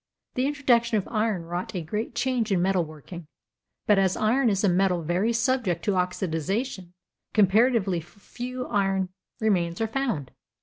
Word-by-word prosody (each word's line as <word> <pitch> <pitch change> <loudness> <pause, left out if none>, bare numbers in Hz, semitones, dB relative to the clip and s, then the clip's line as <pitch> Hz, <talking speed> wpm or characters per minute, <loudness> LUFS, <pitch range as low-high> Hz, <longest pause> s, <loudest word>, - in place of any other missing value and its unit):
The 255 +2 +1
introduction 240 -5 +2
of 200 - -2
iron 215 -5 0
wrought 175 +5 -5
a 175 - -2
great 210 +8 -4
change 245 -5 0
in 190 - +3
metalworking, 175 -2 -2 0.6
but, 210 -2 +4
as 190 -1 +2
iron 240 +3 +3
is 200 -1 0
a - - +4
metal 180 -1 +2
very 180 +8 +1
subject 235 -7 0
to 205 - +2
oxidization, 185 - -2 0.4
comparatively 210 -2 +3
few 245 +8 -8
early - - -10
iron 195 -2 +1 0.3
remains 175 -6 +1
are 225 - +1
found. 225 - -2
200 Hz, 150 wpm, -26 LUFS, 180-235 Hz, 0.6 s, but